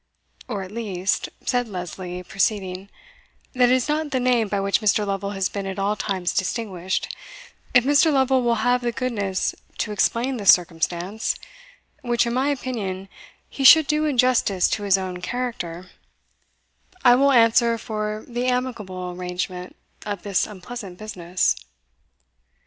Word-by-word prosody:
" - - -23
Or 205 -5 -3
at 185 - -10
least," 200 -4 -2 0.2
said 245 -2 +1
Lesley, 180 -2 -6
proceeding, 190 0 -1 0.6
"that 250 -2 +4
it 255 - +5
is 255 - 0
not 305 0 -1
the 265 -3 0
name 245 -3 +2
by 200 0 -1
which 200 +3 +1
Mr. 210 0 +2
Lovel 200 0 -2
has 190 -1 +1
been 200 -1 -5
at 190 - -5
all 200 +2 0
times 190 -4 -2
distinguished 190 -2 -2 0.6
if 250 - +7
Mr. 290 +4 +4
Lovel 265 -2 +3
will 235 -1 +2
have 245 0 +3
the 240 -1 -1
goodness 205 -7 -1 0.2
to 210 - -2
explain 240 +5 0
this 205 -3 +1
circumstance, 175 +4 0 0.7
which, 240 -2 +1
in 235 - -2
my 265 +3 +1
opinion, 205 -9 -3 0.4
he 275 - -5
should 315 +3 +9
do 305 +1 +1
in 290 -4 -1
justice 235 -7 +3
to - - -1
his 200 -1 +3
own 185 -1 -5
character, 185 -6 -4 1.1
I 245 - +9
will 275 +3 +4
answer 230 -1 +4
for 215 -1 -4
the 245 +1 -2
amicable 215 -8 -2
arrangement 180 0 -5 0.3
of 205 -3 -5
this 200 -2 0
unpleasant 205 -1 -8
business." 180 -4 -1
210 Hz, 155 wpm, -23 LUFS, 185-245 Hz, 1.1 s, should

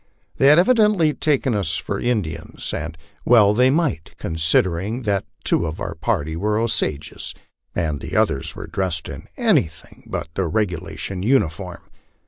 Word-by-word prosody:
They 135 - +4
had 150 +2 +8
evidently 210 -6 +4
taken 140 -5 +1
us 85 -5 0
for - - -3
Indians, 90 -10 -3
and 80 +1 -4 0.3
well 105 -4 +6
they 125 +4 +4
might, 145 - 0
considering 85 +7 0
that 100 -3 0 0.2
two 85 - +1
of 80 - -5
our - - -3
party 80 +2 -1
were 105 +5 0
Osages 110 -10 -2 0.4
and 80 -5 -1
the - - -6
others 65 - +1
were - - -6
dressed 90 -5 -3
in - - -8
anything 80 -1 0
but - - -4
the 95 -2 -1
regula 90 -1 -2
tion 95 -2 -4
uniform. 95 - 0
95 Hz, 150 wpm, -21 LUFS, 80-125 Hz, 0.4 s, had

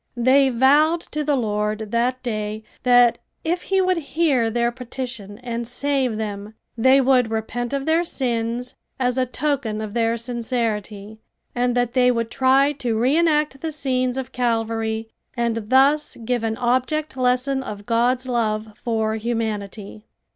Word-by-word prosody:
They 265 +3 +4
vowed 290 +7 +4
to 300 0 -2
the 290 -1 +1
Lord 210 -2 -2
that 250 +2 0
day 215 -2 -3 0.2
that 245 -1 +5 0.2
if 345 +2 -1
he 385 0 +1
would 370 -1 +2
hear 290 -6 +1
their 235 +1 0
petition 240 -4 -7
and 235 -1 -4
save 260 -2 0
them, 210 0 -5 0.2
they 260 +4 +5
would 255 -3 +3
repent 225 +2 -3
of 275 -1 -2
their 325 +2 +2
sins 240 -5 -2 0.3
as 250 0 +1
a 255 - +1
token 255 -5 -2
of 215 -1 -5
their 230 0 +1
sincerity, 225 -3 -3 0.3
and 245 0 0
that 245 -1 0
they 250 -1 +4
would 230 -2 -1
try 270 +2 +3
to 235 -4 -1
re 255 +6 +2
enact 300 -4 +2
the 320 - -3
scenes 255 -3 -1
of 265 -1 -4
Calvary 225 -2 -1 0.3
and 230 -2 -1
thus 280 +4 +3
give 245 -1 0
an 220 0 -1
object 260 +5 0
lesson 255 +1 +1
of 205 -5 -7
God's 245 +3 +1
love 220 -3 -1
for 220 -2 0
humanity. 215 -2 -4
245 Hz, 155 wpm, -22 LUFS, 225-265 Hz, 0.3 s, that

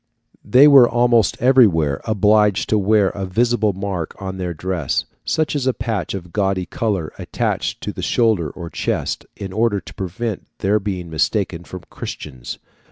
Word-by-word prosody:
They 135 +4 +6
were 135 -4 +8
almost 120 -2 +2
everywhere 100 - +4
obliged 105 -2 +2
to 110 - +3
wear 100 0 +3
a 100 - -6
visible 115 +2 +1
mark 95 -4 -4
on 95 -1 -5
their 90 -2 -3
dress, 85 -3 -2 0.2
such 155 -1 0
as 135 -3 -1
a 130 - +1
patch 110 -5 -3
of 90 -3 -8
gaudy 95 -3 0
colour 105 - -2
attached - - -2
to - - -4
the - - -6
shoulder 110 -10 +1
or 85 +3 -8
chest, - - -2
in 95 -2 -7
order 110 -1 +1
to - - -12
prevent 95 +3 -4
their 100 +2 +1
being 95 -4 -5
mistaken 85 +1 -1
for 95 - -8
Christians. 65 -5 -7
100 Hz, 165 wpm, -20 LUFS, 90-115 Hz, 0.2 s, were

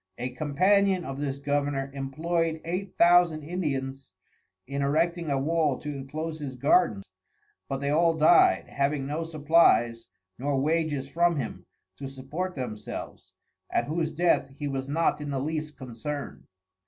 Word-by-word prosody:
A 125 +1 -3
Companion 185 +7 +2
of 135 0 -5
this 140 -2 -2
Governour 140 -1 -1
employed 160 +4 -1
Eight 180 +3 -4
Thousand 170 -3 +5
Indians 135 - -3 0.5
in 140 +1 -3
Erecting 165 +4 +1
a 140 - +1
wall 150 -1 +1
to 150 - -7
inclose 155 +4 -5
his 135 -3 -5
Garden, 125 - +3 0.7
but 135 0 -3
they 140 0 0
all 165 +2 +3
dyed, 160 +2 +5
having 140 0 -1
no 150 +4 -2
Supplies, 150 -7 +3 0.3
nor 140 +1 0
Wages 150 -2 0
from 170 +4 +2
him, 140 - -5 0.3
to 140 - -6
support 145 +8 -5
themselves, 110 -6 -7 0.4
at - - +1
whose 160 +1 -1
Death 170 -4 +2
he 145 - -3
was 135 -1 -3
not 160 +1 +1
in 145 - -5
the 135 -1 -1
least 155 +1 -3
concern'd. 130 +3 -6
145 Hz, 145 wpm, -27 LUFS, 135-165 Hz, 0.7 s, Thousand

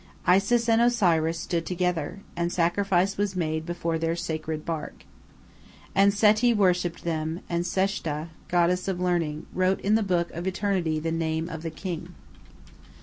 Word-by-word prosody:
Isis 200 +6 +3
and 225 0 +4
Osiris 170 -9 +3
stood 170 0 -2
together, 180 0 -2
and 170 0 -1
sacrifice 185 +2 +1
was 200 -1 -1
made 160 -2 -2
before 170 -1 -2
their 165 +1 0
sacred 155 -2 -4
bark. 160 -3 -5 0.9
And 200 +1 +5
Seti 215 +3 +4
worshipped 180 -4 +1
them, 160 0 -2
and 170 0 -1
Seshta, 175 -5 -1 0.2
goddess 180 +1 +2
of 190 -2 -1
learning, 170 -4 -1
wrote 185 +1 +1
in 205 - +1
the 220 - +4
book 175 -4 0
of 175 +3 -5
eternity 185 -4 0
the 165 +1 -2
name 160 0 -1
of 160 -2 -6
the 165 - -3
king. 165 - -6
175 Hz, 150 wpm, -26 LUFS, 165-195 Hz, 0.9 s, And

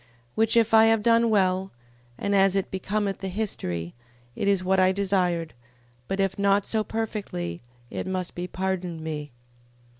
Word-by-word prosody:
15:39. - - -30 0.3
Which 225 +1 +2
if 230 -1 +3
I 220 0 +8
have 225 -1 +3
done 230 0 +4
well, 190 -2 +1 0.5
and 200 - -1
as 195 -1 +4
it 195 - -1
becometh 195 +1 -2
the 195 - -4
history, 90 - -3 0.4
it - - -2
is 195 -2 +2
what 190 +1 +2
I 185 0 +5
desired: 185 -4 0 0.5
but 195 - -3
if 195 0 0
not 200 0 +3
so 220 -1 0
perfectly, 205 - -4 0.3
it - - -4
must 185 -2 -3
be 175 +1 -4
pardoned 185 -3 -3
me. 150 -2 -5
195 Hz, 170 wpm, -25 LUFS, 180-210 Hz, 0.5 s, I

